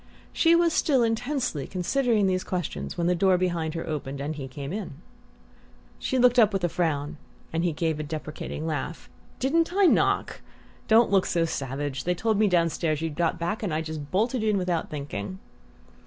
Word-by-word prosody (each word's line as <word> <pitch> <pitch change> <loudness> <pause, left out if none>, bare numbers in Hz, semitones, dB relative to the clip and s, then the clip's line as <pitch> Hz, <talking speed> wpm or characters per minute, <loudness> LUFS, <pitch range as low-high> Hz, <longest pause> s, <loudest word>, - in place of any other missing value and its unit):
She 335 0 +4
was 340 -1 +3
still 270 -7 +3
intensely 235 - -1
considering 220 +3 +1
these 185 -1 +1
questions 140 - -4
when 170 - 0
the 180 - +3
door 185 +1 +3
behind 170 -3 -1
her 165 - -4
opened 140 -3 -4
and 145 +3 -3
he 140 -3 -6
came 140 +4 -6
in. 205 -7 -4 1.1
She 260 - -1
looked 250 0 +5
up 215 -3 +6
with 195 -2 -1
a 175 - +2
frown 155 -4 -1 0.4
and 165 +1 0
he 175 - +2
gave 160 0 -1
a - - -2
deprecating 155 0 -5
laugh. 155 -2 -4 0.3
"Didn't 330 +6 +1
I 395 +2 +4
knock? - - +2 0.5
Don't 225 0 +5
look 195 -2 +3
so 170 -1 +1
savage! 135 -3 -3
They 180 +1 +1
told 215 +3 0
me 215 - +4
downstairs 165 -3 +1
you'd 165 -2 -2
got 170 +2 0
back, 175 +6 -2
and 205 -6 -2
I 155 +1 0
just 155 -2 -6
bolted 225 - 0
in 215 -2 +2
without 180 -3 -1
thinking." 145 - -5
175 Hz, 185 wpm, -26 LUFS, 155-220 Hz, 1.1 s, up